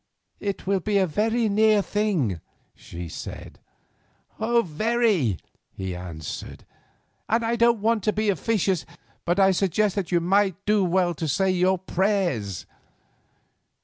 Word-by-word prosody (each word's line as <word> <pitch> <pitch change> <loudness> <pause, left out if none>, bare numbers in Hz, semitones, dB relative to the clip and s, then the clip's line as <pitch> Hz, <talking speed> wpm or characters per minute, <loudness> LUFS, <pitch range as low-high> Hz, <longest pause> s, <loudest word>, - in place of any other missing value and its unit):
"It 200 -1 -4
will 195 0 +1
be 205 +3 0
a 190 - +4
very 220 +7 0
near 215 0 +3
thing," 175 - -1 0.3
she 85 0 -9
said. - - -8 0.8
"Very," 220 - +1 0.3
he 95 -1 -5
answered, 85 -4 -7 0.6
"and 230 +1 +1
I 230 +1 +1
don't 235 -2 +3
want 225 -1 +1
to 215 - +3
be 215 0 0
officious, 190 -2 0 0.4
but 175 +3 +1
I 195 0 +6
suggest 195 +2 +1
that 195 -3 -3
you 175 - +3
might 190 +2 +2
do 210 -1 +3
well 180 0 +2
to 160 0 -4
say 190 +6 +1
your 185 +1 +2
prayers." 180 - -1
195 Hz, 135 wpm, -24 LUFS, 170-215 Hz, 0.8 s, I